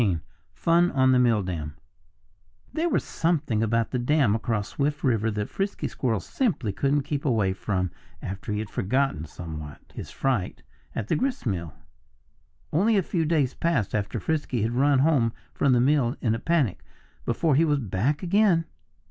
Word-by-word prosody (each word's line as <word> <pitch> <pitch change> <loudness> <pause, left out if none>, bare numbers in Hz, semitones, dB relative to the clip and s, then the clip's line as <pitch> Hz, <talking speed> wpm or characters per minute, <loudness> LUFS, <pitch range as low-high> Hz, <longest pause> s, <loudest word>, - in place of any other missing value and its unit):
XIII 95 -7 +2 0.4
Fun 170 +1 +3
on 130 -1 +4
the 130 - +5
Milldam 90 -11 0 1.0
There 330 +2 0
was - - +1
something 155 -10 0
about 115 +1 +1
the 125 - 0
dam 130 -3 +3
across 110 -2 -1
Swift 145 +1 -1
River 115 -4 +2
that 105 -1 -2
Frisky 195 +1 -2
Squirrel 115 -5 -1
simply 135 - -1
couldn't 140 +5 +1
keep 145 0 -3
away 110 -9 +2
from 95 -2 -2 0.3
after 100 +3 -5
he 105 - -1
had 105 -1 -4
forgotten, 130 - 0
somewhat, 75 -3 -8 0.2
his - - -7
fright 125 -9 -2 0.3
at 110 - -3
the - - +1
gristmill. 105 - -2 1.0
Only 205 +7 +3
a 195 - +2
few 165 -1 -1
days 150 -5 +1
passed 150 - 0
after 105 -1 -1
Frisky 150 -8 -1
had 115 - 0
run 135 +3 +3
home 130 -5 +3 0.2
from 140 - +2
the 125 - +4
mill 130 -1 +2
in 115 -3 +1
a 115 - -2
panic, 145 - 0 0.4
before 145 +6 +1
he 150 +5 +4
was 150 -3 +2
back 125 - -1
again. 180 -2 +3
125 Hz, 165 wpm, -26 LUFS, 105-150 Hz, 1.0 s, the